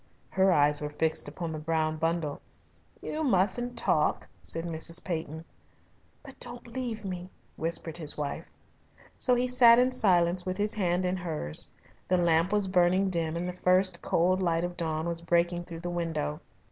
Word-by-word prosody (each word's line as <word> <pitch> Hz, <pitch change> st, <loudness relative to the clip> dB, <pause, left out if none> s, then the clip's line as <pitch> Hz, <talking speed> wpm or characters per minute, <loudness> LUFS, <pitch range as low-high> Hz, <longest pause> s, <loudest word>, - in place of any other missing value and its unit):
Her 190 Hz, 0 st, +3 dB
eyes 145 Hz, -2 st, +3 dB
were 150 Hz, -, -3 dB
fixed 160 Hz, +1 st, -1 dB
upon 165 Hz, +3 st, -5 dB
the 155 Hz, -, -5 dB
brown 155 Hz, 0 st, -1 dB
bundle. 165 Hz, -2 st, -2 dB, 0.6 s
"You 315 Hz, +1 st, -3 dB
mustn't 240 Hz, +1 st, +1 dB
talk," -, -, +1 dB
said 165 Hz, +1 st, -2 dB
Mrs. 165 Hz, 0 st, -1 dB
Peyton. 160 Hz, -2 st, -5 dB, 0.8 s
"But 270 Hz, -2 st, -13 dB
don't 240 Hz, 0 st, -5 dB
leave 235 Hz, -3 st, -5 dB
me," 180 Hz, -1 st, -5 dB, 0.3 s
whispered 165 Hz, 0 st, -1 dB
his 155 Hz, -3 st, +1 dB
wife. 145 Hz, -1 st, -4 dB, 0.7 s
So 250 Hz, -, +4 dB
he 245 Hz, +1 st, +1 dB
sat 245 Hz, -2 st, +6 dB
in 250 Hz, +1 st, +3 dB
silence 180 Hz, -6 st, +3 dB
with 185 Hz, 0 st, -3 dB
his 210 Hz, +1 st, +1 dB
hand 180 Hz, -3 st, 0 dB
in 180 Hz, +1 st, -1 dB
hers. 155 Hz, -, 0 dB, 0.4 s
The 185 Hz, -, +2 dB
lamp 170 Hz, +1 st, +2 dB
was 205 Hz, -2 st, +1 dB
burning 185 Hz, +1 st, +2 dB
dim 165 Hz, -2 st, -1 dB
and 175 Hz, +1 st, -3 dB
the 180 Hz, -, -4 dB
first 180 Hz, 0 st, +2 dB
cold 185 Hz, +3 st, +1 dB
light 170 Hz, -2 st, +1 dB
of 175 Hz, 0 st, -4 dB
dawn 160 Hz, -1 st, -2 dB
was 170 Hz, -1 st, -1 dB
breaking 175 Hz, +1 st, 0 dB
through 165 Hz, -1 st, -8 dB
the 175 Hz, 0 st, -4 dB
window. 165 Hz, -, -3 dB
175 Hz, 170 wpm, -28 LUFS, 165-190 Hz, 0.8 s, sat